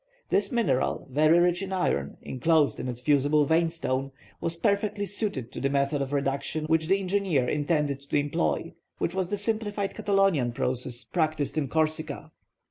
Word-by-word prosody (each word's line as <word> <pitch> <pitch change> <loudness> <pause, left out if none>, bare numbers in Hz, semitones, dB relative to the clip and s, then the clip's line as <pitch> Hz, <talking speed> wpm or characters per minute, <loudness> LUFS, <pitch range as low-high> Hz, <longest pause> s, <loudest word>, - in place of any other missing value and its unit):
This 200 0 +1
mineral, 235 - 0
very 155 +4 +5
rich 175 +1 +3
in 195 -1 -5
iron, 70 - -1
enclosed 150 +3 +2
in - - -4
its 125 -1 -4
fusible 145 +2 +3
vein 165 +3 +3
stone, 135 -5 -2 0.3
was 165 0 -1
perfectly 205 +2 0
suited 195 - -3
to - - -6
the 140 - +1
method 140 +1 +1
of 135 0 -3
reduction 140 +2 -1
which 160 0 +1
the 195 +2 +4
engineer 185 -9 +1
intended 145 -1 0
to - - +2
employ, 145 - -1 0.2
which 170 - -1
was 185 -2 -1
the 205 - -1
simplified 205 -1 -2
Catalonian 195 -12 +2
process 125 0 -2
practised 155 -5 -1
in 155 -3 0
Corsica. 155 +2 -1
155 Hz, 165 wpm, -27 LUFS, 140-190 Hz, 0.3 s, very